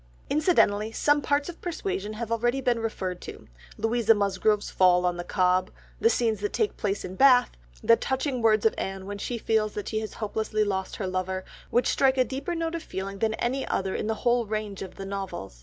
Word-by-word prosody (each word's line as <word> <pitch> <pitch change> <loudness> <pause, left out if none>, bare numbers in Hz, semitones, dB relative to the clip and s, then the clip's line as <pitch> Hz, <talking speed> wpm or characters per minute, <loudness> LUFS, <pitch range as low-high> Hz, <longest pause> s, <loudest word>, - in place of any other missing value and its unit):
Incidentally 225 - +3
some 290 +5 +2
parts 285 0 +1
of 350 -1 -8
Persuasion 320 - -3
have 230 +1 -5
already 240 +3 +1
been 245 -3 +1
referred 190 -5 -3
to, - - -10 0.3
Louisa 225 0 +3
Musgrove's 205 +1 +1
fall 180 -1 +4
on 175 -1 0
the 175 - -4
Cobb, 185 0 +2 0.3
the 455 - +4
scenes 225 - +1
that 205 0 -3
take 435 -2 0
place 200 -1 -2
in 185 - -6
Bath, 250 +3 +5 0.3
the 230 - +6
touching 265 0 -2
words 220 -1 +3
of 220 - +5
Anne 190 0 -4
when 200 0 -6
she 240 +4 -3
feels 220 -1 0
that 210 - -4
she 215 - -1
has 220 -1 -5
hopelessly 215 0 -1
lost 190 -2 -2
her 205 - -4
lover, 185 0 -2 0.2
which 245 - +2
strike 265 -1 +3
a 255 - +5
deeper 270 +9 -4
note 330 0 -2
of 335 - -3
feeling 195 -7 -6
than 220 0 +1
any 260 +4 -1
other 190 0 -1
in - - -2
the 220 - 0
whole 240 -2 +3
range 215 -2 -4
of 190 - -7
the 195 - -7
novels. 195 - -6
215 Hz, 210 wpm, -27 LUFS, 195-245 Hz, 0.3 s, the